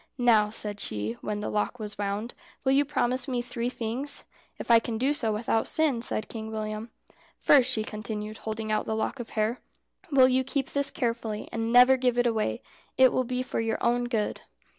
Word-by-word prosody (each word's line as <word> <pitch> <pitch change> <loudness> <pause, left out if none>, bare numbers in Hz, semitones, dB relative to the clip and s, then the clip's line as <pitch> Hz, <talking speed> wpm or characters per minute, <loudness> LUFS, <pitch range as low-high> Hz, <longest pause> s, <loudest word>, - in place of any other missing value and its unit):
"Now," 225 -4 +4
said 210 -1 -3
she, 105 - -2
when 210 0 -3
the - - -3
lock 210 +3 -1
was 210 -2 -6
wound, 205 +3 -3 0.3
"will 265 - +2
you 275 +2 +4
promise 255 -2 0
me 250 -2 -1
three 240 0 -3
things?" 250 +4 -2 0.3
"If - - -2
I 230 - +8
can 225 0 -4
do 265 +5 +2
so 235 -7 0
without 225 +1 0
sin," 300 -7 +1
said 215 - +1
Kind 220 -1 -6
William. 215 +1 -4 0.5
"First," 270 -4 +5
she 215 - 0
continued, 215 0 -6
holding 220 0 -4
out 215 - 0
the 220 - -2
lock 220 +4 -2
of 240 - -6
hair, 215 +3 +1 0.5
"will 265 -2 +7
you 260 0 +2
keep 270 0 -2
this 280 0 0
carefully, 230 -3 -3
and 225 0 -2
never 250 +2 +7
give 250 -1 +1
it 245 - +3
away? 215 - 0 0.3
It 260 -1 +6
will 255 - +1
be 250 +1 -2
for 255 - -3
your 225 0 -1
own 240 +1 +1
good." 225 -4 -2
230 Hz, 205 wpm, -27 LUFS, 215-255 Hz, 0.5 s, I